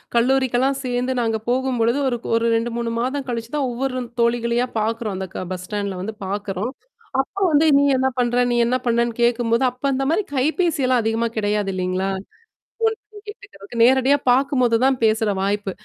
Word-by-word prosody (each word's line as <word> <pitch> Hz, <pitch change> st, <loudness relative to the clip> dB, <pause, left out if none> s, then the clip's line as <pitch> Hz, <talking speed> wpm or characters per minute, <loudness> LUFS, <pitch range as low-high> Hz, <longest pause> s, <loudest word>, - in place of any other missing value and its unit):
கல்லூரிக்கெல்லாம் 260 Hz, +2 st, +2 dB
சேந்து 250 Hz, +1 st, -1 dB
நாங்க 225 Hz, -1 st, 0 dB
போகும்பொழுது, 250 Hz, -1 st, +1 dB
ஒரு 240 Hz, -2 st, 0 dB, 0.2 s
ஒரு 230 Hz, 0 st, +1 dB
2, 230 Hz, +1 st, 0 dB
3 235 Hz, -1 st, -2 dB
மாதம் 265 Hz, +2 st, -2 dB
கழிச்சு 230 Hz, 0 st, -4 dB
தான் 275 Hz, -3 st, 0 dB
ஒவ்வொரு 255 Hz, +1 st, -2 dB, 0.2 s
தோழிகளையா 235 Hz, +1 st, +1 dB
பாக்குறோம். 220 Hz, -1 st, -2 dB
அந்த 190 Hz, 0 st, -4 dB
க 185 Hz, -, -4 dB
பஸ் 185 Hz, 0 st, -5 dB
ஸ்டாண்ட்ல 200 Hz, -3 st, -3 dB
வந்து 215 Hz, +3 st, -5 dB
பாக்குறோம். 205 Hz, +3 st, -3 dB, 0.5 s
அப்ப 385 Hz, +8 st, -8 dB
வந்து 300 Hz, +1 st, +4 dB
நீ 280 Hz, -, +4 dB
என்னா 260 Hz, +1 st, +2 dB
பண்ற? 240 Hz, 0 st, +1 dB
நீ -, -, +1 dB
என்னா 250 Hz, +2 st, +1 dB
பண்ணன்னு 235 Hz, 0 st, +1 dB
கேக்கும்போது, 235 Hz, 0 st, +2 dB
அப்ப 250 Hz, +2 st, -26 dB
அந்த 270 Hz, +1 st, -1 dB
மாரி 360 Hz, -, +2 dB
கைபேசியெல்லாம் 275 Hz, -3 st, +1 dB
அதிகமா 225 Hz, +1 st, 0 dB
கிடையாது 205 Hz, -2 st, 0 dB
இல்லலைங்களா? 185 Hz, +1 st, -1 dB
ஃபோன் -, -, -23 dB, 0.8 s
பண்ணீ 425 Hz, -, -12 dB
கேட்டுக்கதுக்கு. 240 Hz, -, -12 dB
நேரடியா 265 Hz, +3 st, +4 dB
பாக்கும்போது 255 Hz, -2 st, +3 dB
தான் 265 Hz, -1 st, +3 dB
பேசுற 220 Hz, 0 st, +2 dB
வாய்ப்பு. 200 Hz, 0 st, -1 dB
240 Hz, 165 wpm, -21 LUFS, 220-260 Hz, 0.8 s, வந்து